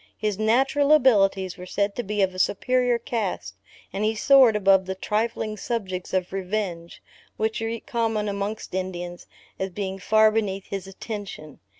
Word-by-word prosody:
His 210 -2 -2
natural 270 +6 +2
abilities 195 - +3
were 180 - -8
said 200 +2 -1
to - - -1
be 210 -2 0
of 185 -1 0
a 185 - -7
superior 245 +5 +2
cast, 200 - -3 0.4
and 200 - -2
he 220 +1 +1
soared 255 0 +6
above 195 -2 +4
the 190 - -3
trifling 215 +2 -2
subjects 190 -5 -4
of 185 -1 -1
revenge, 185 -3 -4 0.3
which 220 +1 -1
are 225 +1 -2
common 225 -3 -1
amongst 200 +1 -4
Indians, 175 -2 -5 0.3
as 190 - -2
being 190 +1 -4
far 215 +3 +4
beneath 195 -3 -1
his 195 -1 -5
attention. 195 - -8
205 Hz, 160 wpm, -24 LUFS, 190-225 Hz, 0.4 s, soared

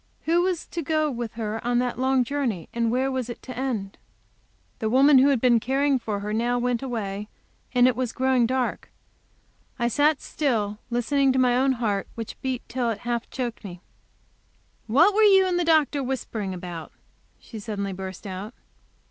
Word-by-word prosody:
Who 335 +2 +3
was 360 -2 -1
to 335 - -5
go 310 0 0
with 235 -3 -5
her 220 0 -4
on 240 0 +1
that 245 -1 -1
long 260 0 +3
journey, 240 - -2
and 235 -1 0
where 260 +3 +1
was 255 -2 -3
it 240 - -6
to 255 - -8
end? 230 - -3 0.8
The 220 - -1
woman 270 +3 +6
who 265 - +5
had 275 -4 +3
been 240 -1 +4
caring 270 +3 +1
for 210 -3 -3
her 210 +1 -3
now 240 +2 +1
went 245 -1 0
away, 210 -6 -4 0.5
and 245 0 +6
it 255 - +2
was 250 -1 -2
growing 260 -2 +2
dark. 255 0 -2 0.9
I 235 -2 +1
sat 290 +4 +3
still 215 -8 -1
listening 265 +3 +2
to - - 0
my 250 -1 +3
own 265 +1 +3
heart, 210 -5 -1
which 225 -1 -7
beat 260 -2 -2
till 245 -1 -1
it 215 -2 -3
half 240 -1 -2
choked 240 -3 -4
me. 180 -3 -9 1.1
"What 320 - +5
were 435 - +3
you 390 -3 +6
and 360 -1 0
the - - +2
doctor 310 -3 +3
whispering 240 -6 -3
about?" 175 -3 -7 0.5
she 225 - -10
suddenly 200 -2 -4
burst 190 0 -7
out. 195 +4 -6
245 Hz, 185 wpm, -25 LUFS, 220-270 Hz, 1.1 s, woman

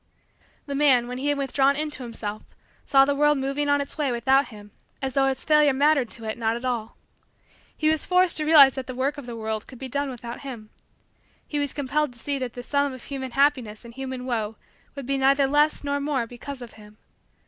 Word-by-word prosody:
The 280 - -5
man, 270 -4 +3
when 250 +1 -5
he 280 - -2
had 290 0 +1
withdrawn 275 0 +2
into 300 -2 -3
himself, 215 -3 -5 0.4
saw 270 -1 +5
the 285 - +1
world 295 +1 +3
moving 275 +2 -1
on 285 0 +3
its 280 +2 -6
way 285 -4 +1
without 265 +3 +2
him 210 -3 -13 0.3
as 265 -1 -3
though 270 0 +3
his 265 -1 -2
failure 300 -2 +5
mattered, 280 -2 +3
to 230 - -10
it, 220 +1 -4
not 225 0 +1
at 240 +2 -6
all. 235 -3 -3 0.8
He 310 - +1
was 310 0 +3
forced 360 -1 +3
to 310 - 0
realize 290 -4 +8
that 265 -1 -6
the 255 - -6
work 275 +3 -1
of 265 - -10
the 240 - -6
world 220 -1 -4
could 255 - -12
be 265 - -6
done 280 +2 -2
without 240 -2 -7
him. 235 -6 -9 0.8
He 295 - -2
was 285 -2 -1
compelled 285 0 -1
to 240 - -11
see 280 +2 -2
that 250 -2 -4
the 245 - -7
sum 285 +1 0
of 255 - -10
human 265 -2 -5
happiness 255 -6 +1
and 235 - -11
human 260 0 -6
woe 225 -4 -2 0.4
would 275 -2 -6
be 275 +1 -1
neither 275 +1 +4
less 295 +3 +2
nor 285 0 -1
more 280 -4 -1
because 250 +3 -8
of 235 - -11
him. 210 0 -16
270 Hz, 225 wpm, -25 LUFS, 240-285 Hz, 0.8 s, realize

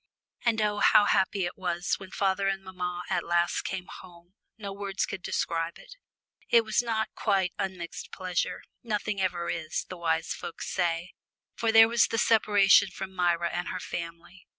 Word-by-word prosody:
And 230 -2 +2
oh, 210 -1 0
how 205 - +6
happy 190 -1 +2
it 175 - -5
was 175 -2 -2
when 190 - -10
father 195 0 0
and 195 0 -1
mamma 180 -1 -4
at 175 - 0
last 175 0 +1
came 185 -1 -4
home 175 0 -13 0.2
no 200 -3 -6
words 195 -1 -2
can 185 - -6
describe 165 -1 -2
it. - - -13 0.6
It 230 -1 +5
was 220 - +2
not 220 -2 -1
quite 195 -4 +1
unmixed 180 -3 -5
pleasure 180 -1 -2 0.2
nothing 210 -3 -2
ever 175 -2 -1
is, 160 -1 -3
the 185 - -7
wise 165 -1 0
folk - - -7
say 175 -1 -1 0.4
for 225 -1 0
there 225 0 +8
was 235 +1 +3
the 225 - -2
separation 205 -3 +5
from 190 +1 -7
Myra 175 -2 +1
and 175 0 -3
her 185 - -3
family. 170 +1 -7
185 Hz, 175 wpm, -28 LUFS, 175-205 Hz, 0.6 s, there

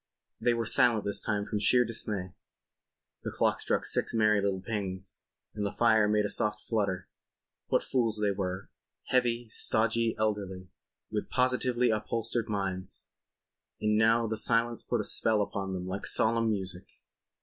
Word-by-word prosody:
They 120 - +2
were 115 0 -1
silent 115 0 +3
this 100 - -1
time 105 -2 -1
from 105 - -2
sheer 125 +4 +4
dismay. 105 -5 -3 0.9
The - - -4
clock - - +1
struck - - 0
six - - 0
merry 105 -2 +3
little 100 -1 0
pings 95 -3 -4 0.3
and 105 - -3
the 100 - -1
fire 110 -1 +3
made 105 0 +2
a - - -1
soft 105 +1 +1
flutter. 100 -5 -1 0.6
What - - +2
fools 115 -4 +1
they 105 -1 +2
were—heavy, 115 +5 -2
stodgy, 115 +1 +1
elderly—with 100 -4 -4
positively 125 -1 +1
upholstered 115 +1 -2
minds. 95 -2 -3 0.7
And 105 0 +1
now 115 +2 +4
the 110 0 -2
silence 115 0 +1
put - - -1
a - - -4
spell 110 -2 +3
upon 100 -1 -2
them 90 -1 -4
like 95 +2 -3
solemn 115 0 +2
music. 95 -3 -2
105 Hz, 150 wpm, -30 LUFS, 100-115 Hz, 0.9 s, sheer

